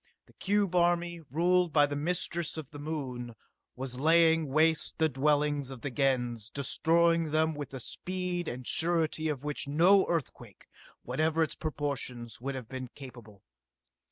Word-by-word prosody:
The - - -23
cube 200 -2 0
army, 175 -1 +1
ruled 175 +3 +2
by 145 -1 +5
the 145 0 -4
mistress 170 +1 -2
of 155 -3 -7
the 145 - -9
Moon, 130 -6 -5 0.4
was 125 -1 -5
laying 160 +1 +4
waste 155 +3 +2
the 160 - +3
dwellings 145 0 +1
of 130 -3 -9
the 140 - -4
Gens, 125 -5 0
destroying 165 +4 +2
them 160 +1 +2
with 145 -2 -6
a - - -5
speed 180 +5 -4
and 125 +1 -5
surety 160 0 +1
of 145 -3 -3
which 145 -1 -2
no 175 +7 +5
earthquake, 165 -6 -4 0.4
whatever 160 +1 +1
its 160 - -2
proportions, 130 -6 -4
would 135 +1 -3
have 125 -4 -7
been 130 0 -6
capable. 120 -7 -12
150 Hz, 155 wpm, -30 LUFS, 130-165 Hz, 0.4 s, by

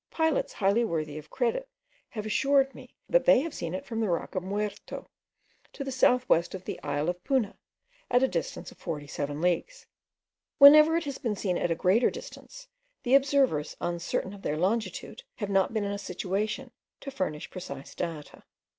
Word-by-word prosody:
Pilots 320 -3 0
highly 205 +3 +2
worthy 155 -7 -2
of 155 - -14
credit 270 - -1 0.4
have 215 -2 -6
assured 270 +6 +2
me, - - -14
that - - +3
they - - +6
have 320 +1 -4
seen 170 +1 -4
it 185 - -5
from 225 -2 -4
the 220 -3 0
rock 170 - -2
of 185 - -1
Muerto, 205 +2 -4 0.7
to 275 - -5
the 270 - -4
south 250 -1 +3
west 170 +3 +2
of 185 0 -9
the - - -5
isle 145 +1 -1
of 175 0 -2
Puna, 260 -7 0 0.5
at 245 +1 +4
a - - +5
distance 170 -9 -4
of - - -18
47 145 -2 -4
leagues. 470 - -1 0.7
Whenever 305 +3 +9
it 335 - -1
has 280 -2 -5
been 225 -4 -1
seen 185 -2 -1
at 175 - 0
a 165 - +1
greater 195 +8 +3
distance, - - -10 0.4
the 245 - +1
observers, 270 - +3
uncertain 175 +2 -2
of 200 - -11
their 150 - -2
longitude, 215 - -2
have 205 -4 -4
not 195 -1 +3
been 220 -2 -1
in 200 - -2
a 200 - -3
situation 205 +7 -3 0.3
to 275 - -6
furnish 155 - -3
precise 140 -7 -8
data. 165 -4 -6
205 Hz, 185 wpm, -28 LUFS, 175-265 Hz, 0.7 s, Whenever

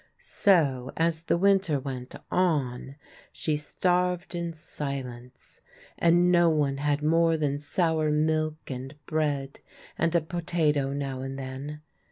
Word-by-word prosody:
So, 140 -10 +2
as 165 0 +1
the - - +2
winter 190 -5 +3
went 130 -2 -6 0.2
on, 140 -7 0 0.4
she 155 - -1
starved 180 +4 0
in 170 -1 -3
silence, 135 -5 -7 0.3
and 175 +1 +4
no 175 -1 +5
one 145 -3 +1
had 145 +1 0
more 165 +1 +3
than 145 -2 -1
sour 160 +1 +1
milk 155 0 0
and 130 +3 -6
bread 145 -3 -1 0.4
and 165 +1 +1
a 170 - +4
potato 160 -4 0
now 135 -2 -3
and 135 0 -5
then. 135 +3 -6
150 Hz, 130 wpm, -27 LUFS, 135-170 Hz, 0.4 s, no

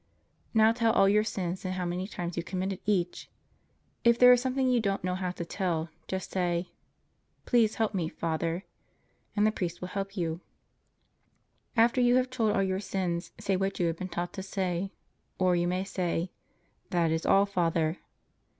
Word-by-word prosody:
Now 220 0 +6
tell 230 -1 +2
all 195 - +5
your 210 +2 +4
sins 185 -4 -3
and 185 -1 -2
how 180 -1 -2
many 180 +2 -2
times 175 -4 -5
you 170 - -1
committed 185 +2 -3
each. 180 -4 0 0.7
If 235 0 +5
there 250 0 +9
is 245 - +3
something 260 0 0
you 250 -1 +3
don't 200 -4 -1
know 180 0 0
how 185 0 -2
to 175 -1 -5
tell, 170 -3 -2 0.2
just 190 -1 -4
say, 175 -1 -1 0.7
"Please 230 -4 +3
help 220 -1 0
me, 170 -5 -1
Father," 165 +2 -2 0.7
and 210 0 +3
the 215 - +4
priest 175 -5 -3
will 180 - -6
help 195 +1 -4
you. 165 -1 -2 1.4
After 235 +3 +4
you 245 0 +5
have 255 0 +2
told 225 -5 +1
all 195 - +3
your 190 0 0
sins, 185 -3 -2
say 195 - 0
what 195 +1 -1
you 175 - +2
have 165 -1 0
been 185 +1 -5
taught 175 0 -3
to 190 - -5
say. 190 -1 -2 0.5
Or 185 -1 +3
you 175 0 +1
may 180 +1 0
say: 180 -2 -2 0.6
That 170 -2 +2
is 160 0 0
all, 195 +1 +5
Father. 165 -3 0
185 Hz, 185 wpm, -29 LUFS, 175-210 Hz, 1.4 s, there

